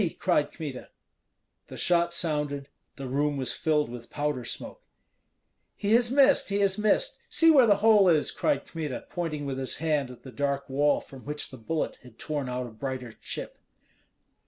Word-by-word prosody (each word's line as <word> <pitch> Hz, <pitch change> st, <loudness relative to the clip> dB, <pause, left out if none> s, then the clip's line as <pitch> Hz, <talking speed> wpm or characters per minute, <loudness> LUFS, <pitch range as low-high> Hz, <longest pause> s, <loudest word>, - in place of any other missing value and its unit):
cried 150 Hz, -6 st, +1 dB
Kmita. 145 Hz, -6 st, -7 dB, 0.8 s
The -, -, -9 dB
shot 170 Hz, -1 st, +2 dB
sounded; 150 Hz, -4 st, -1 dB, 0.3 s
the 135 Hz, -1 st, -6 dB
room 145 Hz, +2 st, 0 dB
was 130 Hz, -2 st, -1 dB
filled 150 Hz, -2 st, +1 dB
with 120 Hz, 0 st, -9 dB
powder 145 Hz, -4 st, -2 dB
smoke. -, -, -7 dB, 0.9 s
"He 205 Hz, +1 st, 0 dB
has 235 Hz, 0 st, +4 dB
missed, 275 Hz, -1 st, +4 dB
he 200 Hz, -, 0 dB
has 195 Hz, -1 st, +3 dB
missed! 355 Hz, -, +2 dB
See 330 Hz, 0 st, +5 dB
where 265 Hz, -6 st, +6 dB
the 205 Hz, -, +6 dB
hole 210 Hz, -4 st, +6 dB
is!" 155 Hz, -3 st, +2 dB
cried 295 Hz, -, 0 dB
Kmita, 155 Hz, -6 st, -5 dB
pointing 155 Hz, -4 st, -3 dB
with 135 Hz, -1 st, -3 dB
his 130 Hz, -, -2 dB
hand 150 Hz, -5 st, 0 dB
at 125 Hz, -, -12 dB
the 130 Hz, -, -10 dB
dark 140 Hz, 0 st, -2 dB
wall 145 Hz, +2 st, +2 dB
from 135 Hz, -2 st, -13 dB
which 150 Hz, +1 st, -5 dB
the 130 Hz, -, -9 dB
bullet 155 Hz, +8 st, -3 dB
had 125 Hz, -3 st, -16 dB
torn 145 Hz, -4 st, -3 dB
out 125 Hz, 0 st, -3 dB
a 120 Hz, -, -9 dB
brighter 130 Hz, +1 st, -5 dB
chip. -, -, -7 dB
150 Hz, 180 wpm, -27 LUFS, 135-175 Hz, 0.9 s, where